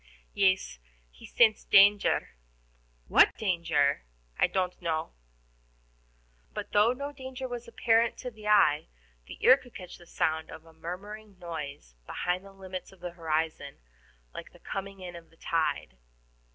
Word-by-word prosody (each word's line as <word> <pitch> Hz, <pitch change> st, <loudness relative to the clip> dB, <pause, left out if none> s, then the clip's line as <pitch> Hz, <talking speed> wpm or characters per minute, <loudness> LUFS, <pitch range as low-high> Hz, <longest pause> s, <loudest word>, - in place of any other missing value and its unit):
"Yes, 185 Hz, -, +2 dB, 0.3 s
he -, -, -13 dB
scents 220 Hz, -3 st, +4 dB
danger." 200 Hz, +1 st, +5 dB, 0.8 s
"What -, -, +5 dB
danger?" 165 Hz, -8 st, +1 dB, 0.3 s
"I -, -, +3 dB
don't 185 Hz, -1 st, -2 dB
know." 160 Hz, -1 st, -2 dB, 1.4 s
But, -, -, -5 dB
though 210 Hz, +3 st, +5 dB
no 280 Hz, +3 st, -4 dB
danger 260 Hz, -2 st, -7 dB
was 240 Hz, -1 st, -6 dB
apparent 230 Hz, 0 st, +2 dB
to 250 Hz, -, -6 dB
the 215 Hz, -2 st, -10 dB
eye, 195 Hz, -8 st, +4 dB, 0.4 s
the -, -, -9 dB
ear 260 Hz, -, +9 dB
could 245 Hz, -3 st, -17 dB
catch 180 Hz, -2 st, -9 dB
the 175 Hz, -, -16 dB
sound 160 Hz, -1 st, -1 dB
of 160 Hz, 0 st, -11 dB
a 165 Hz, -, -17 dB
murmuring 195 Hz, +5 st, -8 dB
noise 150 Hz, -, -7 dB
beyond 180 Hz, +1 st, -2 dB
the 195 Hz, -, -12 dB
limits 190 Hz, -1 st, -8 dB
of 190 Hz, -, -18 dB
the 175 Hz, -1 st, -5 dB
horizon, 160 Hz, -3 st, -2 dB, 0.6 s
like -, -, -9 dB
the -, -, -17 dB
coming 195 Hz, 0 st, -6 dB
in 175 Hz, -1 st, -7 dB
of 170 Hz, -1 st, -12 dB
the 165 Hz, -, -25 dB
tide. 155 Hz, -, -1 dB
185 Hz, 150 wpm, -29 LUFS, 160-210 Hz, 1.4 s, ear